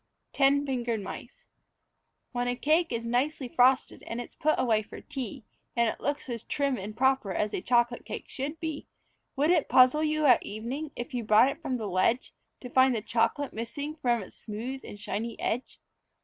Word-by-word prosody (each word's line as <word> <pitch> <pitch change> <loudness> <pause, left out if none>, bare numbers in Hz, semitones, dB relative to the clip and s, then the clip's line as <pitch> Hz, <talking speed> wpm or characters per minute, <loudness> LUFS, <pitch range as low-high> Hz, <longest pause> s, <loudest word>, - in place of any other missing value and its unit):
TEN 280 +1 +4
FINGERED 240 -4 -1
MICE 195 - -9 0.9
When 245 -1 -1
a 245 - 0
cake 315 +6 +2
is 230 -1 -2
nicely 260 +3 0
frosted 255 +2 +3
and 230 - -4
it's 245 - -7
put 310 +1 +1
away 220 -3 +2
for 210 - -10
tea, 255 -6 -6 0.3
And 235 -1 +3
it - - -2
looks 285 0 -2
as 235 -3 -4
trim 280 +2 0
and 210 0 -7
proper 265 -6 +2
as 210 +3 -1
a - - -2
chocolate 240 +1 +2
cake - - -7
should 290 +4 -5
be, 315 -2 -4 0.5
Would 295 +4 +3
it 335 -5 +2
puzzle 255 +4 +6
you 310 0 +1
at 250 -4 +6
evening 245 +9 -5
as 240 +4 -5
you 245 -2 -2
brought 220 +4 +6
it 275 - -6
from 260 -5 -2
the 220 - -4
ledge 195 +7 +1 0.3
To 250 - -7
find 260 -1 +5
the 215 - -3
chocolate 230 +5 0
missing 280 +7 -5
from 240 -7 0
its - - -13
smooth 235 +5 -5
and 205 - -9
shiny 225 +2 -4
edge? 245 +3 -3
245 Hz, 190 wpm, -28 LUFS, 230-280 Hz, 0.9 s, puzzle